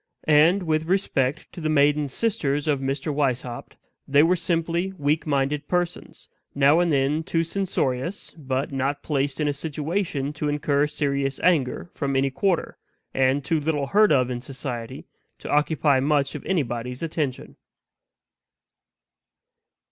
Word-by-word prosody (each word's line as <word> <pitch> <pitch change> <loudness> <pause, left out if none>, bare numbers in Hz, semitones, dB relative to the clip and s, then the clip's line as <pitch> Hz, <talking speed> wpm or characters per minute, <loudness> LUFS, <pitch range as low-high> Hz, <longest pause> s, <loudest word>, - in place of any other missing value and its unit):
And, 160 +6 +5
with 155 -1 0
respect 160 -6 0
to 175 - -8
the 155 - -1
maiden 145 0 +3
sisters 145 - -1
of 145 -3 +2
Mr. 135 +3 -2
Weishaupt, 130 -4 -2 0.3
they 145 +2 +5
were 175 +3 +4
simply 170 +2 -1
weak 155 +1 0
minded 145 +1 0
persons, 175 -1 -3 0.3
now 140 +3 +5
and 175 -1 +2
then 140 +2 +1
too 165 +1 0
censorious, 165 -4 -2
but 135 -3 -3
not 135 +1 -2
placed 140 -1 -1
in 150 - +1
a 145 - +1
situation 150 0 -3
to 150 -1 -2
incur 145 0 +1
serious 140 -2 -1
anger 170 -1 +1
from 140 -2 -2
any 135 0 +2
quarter, 180 +5 -1 0.3
and 135 +1 +1
too 160 +2 +1
little 145 -1 -1
heard 210 +8 +4
of 130 -3 +3
in 120 -1 -4
society 125 -3 -6 0.3
to - - -7
occupy 150 -2 +2
much 140 0 +1
of - - -7
anybody's 125 -6 -2
attention. 155 -5 -3
145 Hz, 140 wpm, -24 LUFS, 135-160 Hz, 0.3 s, And